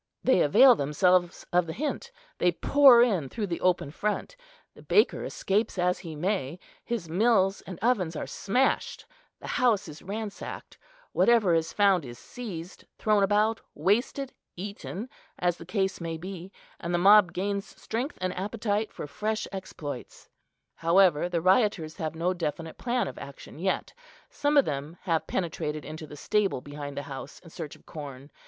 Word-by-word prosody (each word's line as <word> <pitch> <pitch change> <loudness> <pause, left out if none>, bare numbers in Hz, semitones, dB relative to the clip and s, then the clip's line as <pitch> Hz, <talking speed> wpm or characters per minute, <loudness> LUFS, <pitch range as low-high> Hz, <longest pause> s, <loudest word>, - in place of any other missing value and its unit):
They 260 -9 +4
avail 245 - +7
themselves 175 +2 +2
of 175 -1 +3
the 160 - -4
hint; 305 - -3 0.3
they 175 0 +3
pour 265 - +7
in 185 - 0
through 215 - -3
the 170 -4 -4
open 180 -5 +1
front, 210 - -2 0.4
the - - -15
baker 425 - +3
escapes 200 +2 -1
as 180 0 +1
he 165 -4 -8
may, 175 -2 -1 0.3
his 235 -8 -3
mills 195 +2 +2
and 185 - -6
ovens 195 -9 +1
are - - -3
smashed, 250 +7 0 0.3
the - - -11 0.2
house 225 -7 +3
is 155 -1 -10
ransacked; 210 +1 -6 0.3
whatever 225 -7 +4
is 165 -1 +1
found 195 -5 +3
is 120 -2 -9
seized, 180 - -8
thrown 210 -2 +2
about, 210 +3 +2
wasted, 240 - 0 0.2
eaten, 200 +3 -6 0.3
as 175 -1 0
the 165 - -11
case 190 -2 -1
may 165 -1 -3
be; 185 +1 -8 0.3
and 170 +1 -2
the - - +3
mob 195 0 +7
gains 200 +1 -3
strength 245 +6 -3
and 185 0 -1
appetite 210 +2 -2
for - - -6
fresh 215 +9 -2
exploits. 150 -9 -7 0.4
However, 175 -1 +3
the 170 -2 -1
rioters 185 -4 +2
have 160 0 -3
no 175 +3 0
definite 165 -2 -4
plan 245 0 0
of - - -7
action - - -10
yet. - - -1 0.4
Some 290 0 +1
of 280 - +6
them 145 +3 -4
have 165 -4 0
penetrated 155 -4 -3
into 155 0 -7
the 150 - -10
stable 200 -1 +1
behind 145 +1 -8
the 140 - -3
house 135 +1 -8
in 165 -3 -15
search 160 -4 -7
of - - -22
corn. 140 -2 -9
185 Hz, 165 wpm, -28 LUFS, 160-215 Hz, 0.4 s, avail